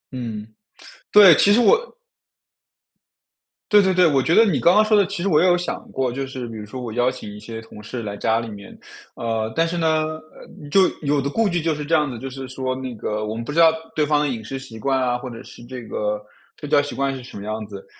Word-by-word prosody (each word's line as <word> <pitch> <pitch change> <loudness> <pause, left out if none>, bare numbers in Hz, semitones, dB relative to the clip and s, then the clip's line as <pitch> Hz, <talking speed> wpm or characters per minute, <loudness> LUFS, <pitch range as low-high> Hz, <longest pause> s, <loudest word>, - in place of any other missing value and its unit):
嗯， 110 -4 -5 0.7
对， 200 -4 +9
其 205 - +5
实 235 - +5
我 480 - +3 1.8
对， 205 -1 +7
对， 190 -1 +2
对， 180 0 +4
我 135 -3 +2
觉 165 - +1
得 225 - +7
你 180 -9 +1
刚 175 +3 +4
刚 215 - +6
说 215 0 +3
的 200 - +4
其 195 -2 -5
实 200 - +1
我 155 -1 +4
也 185 - +4
有 175 0 +4
想 175 - -4
过， 130 -2 -1
就 135 +2 -3
是 130 -2 -6
比 115 - -9
如 105 - -7
说 125 +5 -8
我 115 -2 -5
邀 125 +1 +2
请 125 -5 -8
一 105 - -10
些 115 +1 -8
同 110 -1 -13
事 120 +3 -6
来 100 -1 -5
家 110 +2 +1
里 115 - -5
面。 100 -1 -11 0.4
呃， 115 -1 -2
但 165 0 +2
是 175 +1 -3
呢 160 -1 +2 0.7
就 190 +1 +5
有 145 -1 +1
的 140 - -2
顾 225 +6 +1
忌 175 -1 -1
就 160 -1 0
是 150 0 -5
这 165 +2 +2
样 150 -1 +2
子 125 - -6
的， 115 - -9
就 135 - -5
是 135 0 -7
说 130 0 -3
那 130 -1 -6
个 105 0 -3
我 110 +1 -4
们 115 - -4
不 135 - -6
知 165 - 0
道 165 -1 +7 0.2
对 155 -1 +2
方 150 0 +2
的 150 - +1
饮 115 -4 -4
食 135 +5 -6
习 115 -4 -11
惯 135 +2 0
啊， 125 -1 0
或 130 0 -7
者 115 - -9
是 - - -13
这 125 -1 -8
个 105 -1 -3 0.4
睡 150 - -7
觉 145 - +5
习 145 - -6
惯 135 0 -1
是 130 - -9
什 125 - -11
么 100 - -8
样 110 0 -4
子， 100 -2 -10
130 Hz, 285 characters per minute, -22 LUFS, 115-165 Hz, 1.8 s, 对